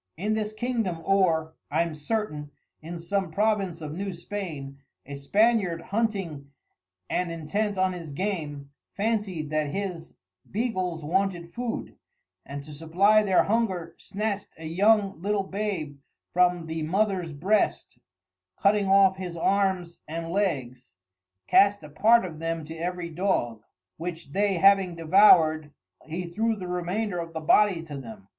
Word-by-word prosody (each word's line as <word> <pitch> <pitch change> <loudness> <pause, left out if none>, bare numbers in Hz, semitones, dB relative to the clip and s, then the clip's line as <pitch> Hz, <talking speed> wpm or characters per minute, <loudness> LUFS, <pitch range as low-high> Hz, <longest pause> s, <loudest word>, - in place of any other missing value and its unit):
In 210 +5 -1
this 215 -1 -1
Kingdom 220 -5 -2
or 165 -5 +2 0.2
(I'm 170 -1 0
certain) 150 -2 -3 0.3
in 170 +2 -7
some 190 +2 -2
Province 195 -2 0
of 150 -1 -5
New 195 +3 -4
Spain, 165 -7 -6 0.3
A 140 - -8
Spaniard 195 +4 +2
Hunting 190 -9 -2 0.6
and 180 -1 -1
intent 195 +6 -2
on 185 0 +2
his 170 -3 -7
game, 145 -4 -4 0.3
phancyed 200 -8 -1
that 155 -1 +1
his 175 0 -5 0.3
Beagles 185 -8 -2
wanted 175 0 -1
food; 240 -1 -4 0.5
and 140 0 -6
to 150 +1 -11
supply 180 +8 +3
their 195 -3 +3
hunger 190 -7 -1
snatcht 205 0 -3
a 160 - -9
young 195 +2 +2
little 200 +1 0
Babe 190 -8 -4 0.3
from 180 -1 +3
the 160 0 -4
Mothers 185 +1 0
breast, 185 +9 0 0.6
cutting 200 0 +3
off 195 -1 +5
his 180 -2 -6
Arms 185 -2 0
and 165 +2 -5
Legs, 130 - -2 0.5
cast 200 - +4
a 150 - -10
part 220 +8 +4
of 160 -4 -7
them 165 -1 -3
to 160 - -8
every 175 +1 -4
Dog, 155 - -1 0.4
which 165 -3 -6
they 200 +3 +2
having 195 -1 +4
devour'd, 160 -3 +5 0.4
he 170 +3 -4
threw 220 +6 0
the 185 -3 -7
remainder 180 +2 -2
of 165 -1 -6
the 160 - -3
Body 175 +2 +3
to 155 -3 -8
them. 110 -7 -9
180 Hz, 140 wpm, -26 LUFS, 160-200 Hz, 0.6 s, off